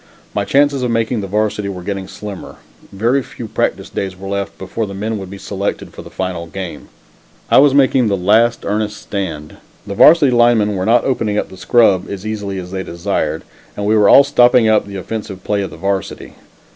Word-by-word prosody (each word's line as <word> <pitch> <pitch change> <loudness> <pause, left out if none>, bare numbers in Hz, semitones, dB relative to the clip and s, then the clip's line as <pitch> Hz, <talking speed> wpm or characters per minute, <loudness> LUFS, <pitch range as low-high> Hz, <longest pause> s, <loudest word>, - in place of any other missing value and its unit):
My 100 -1 -1
chances 140 +1 +2
of 125 - -1
making 115 0 0
the 100 - -5
Varsity 105 0 -1
were 90 -2 -7
getting 95 0 -4
slimmer. 105 -3 -9 0.4
Very 115 +7 +1
few 120 -2 -9
practice - - -2
days 95 -1 -5
were 95 +1 -9
left 100 0 -4
before 105 +3 -4
the 100 - -8
men 110 +2 -3
would 95 -1 -8
be 100 - -8
selected 100 0 -4
for - - -9
the - - -12
final 90 -3 -4
game. 95 +1 -7 0.6
I - - +7
was 140 0 +5
making 130 -3 +3
the 100 -2 0
last 110 +6 +2
earnest 105 0 -2
stand. 80 -7 -5 0.3
The 100 - -5
varsity 150 +6 +6
line 120 -1 +4
men 105 -1 0
were 95 +1 -2
not 120 +1 +3
opening 110 -5 -1
up - - -2
the - - -12
scrub 100 -3 +3
line - - -6
as 100 +1 -11
easily 105 -3 -4
as 90 -1 -7
they 95 0 -3
desired, 85 -2 -3 0.3
and 100 - -3
we 110 +2 +2
were 105 -2 +4
all 140 - +8
stopping 125 -4 +4
up 110 -2 +2
the 100 - -8
offensive 100 -1 -6
play 105 -1 -1
of 95 - -4
the - - -12
Varsity. 100 0 -3
105 Hz, 215 wpm, -17 LUFS, 95-115 Hz, 0.6 s, all